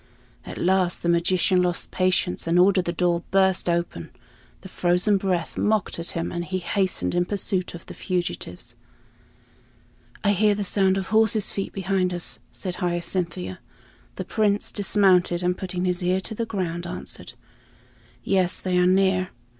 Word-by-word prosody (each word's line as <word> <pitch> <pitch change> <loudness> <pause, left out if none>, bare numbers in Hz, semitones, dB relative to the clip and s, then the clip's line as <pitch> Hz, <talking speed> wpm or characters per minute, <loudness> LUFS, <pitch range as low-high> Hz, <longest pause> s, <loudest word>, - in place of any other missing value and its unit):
At - - -7
last 185 -1 +1
the 170 - +1
magician 180 +2 +3
lost 175 -1 0
patience 185 -2 0
and 170 +1 +2
ordered 185 0 +4
the 170 - -1
door 175 0 +1
burst 190 -2 +2
open. 170 - -2 0.5
The - - -10
frozen 180 +3 +2
breath 185 -3 -2
mocked 215 -5 0
at 170 - -3
him, 165 - -2
and 175 0 -3
he 185 +2 -3
hastened 185 +1 -1
in 175 0 +2
pursuit 190 -2 -2
of 170 - -11
the - - -9
fugitives. 175 - -4 1.5
"I 205 - +4
hear 205 +1 +3
the 205 - -2
sound 195 -1 +2
of 190 -1 -3
horses' 220 -1 +3
feet 195 - -4
behind 190 -1 -1
us," 175 - -2
said 180 -3 -5
Hyacinthia. 175 - -2 0.6
The 185 - -5
Prince 205 +1 0
dismounted, 185 -4 +3
and 180 0 +1
putting 185 -1 -3
his 180 0 0
ear 180 +1 +2
to 220 - -6
the 230 +1 -3
ground, 175 -4 -3
answered, - - -7 0.9
"Yes, 185 -2 +1
they 180 -1 0
are 180 - +4
near." 185 0 +2
185 Hz, 160 wpm, -24 LUFS, 175-195 Hz, 1.5 s, ordered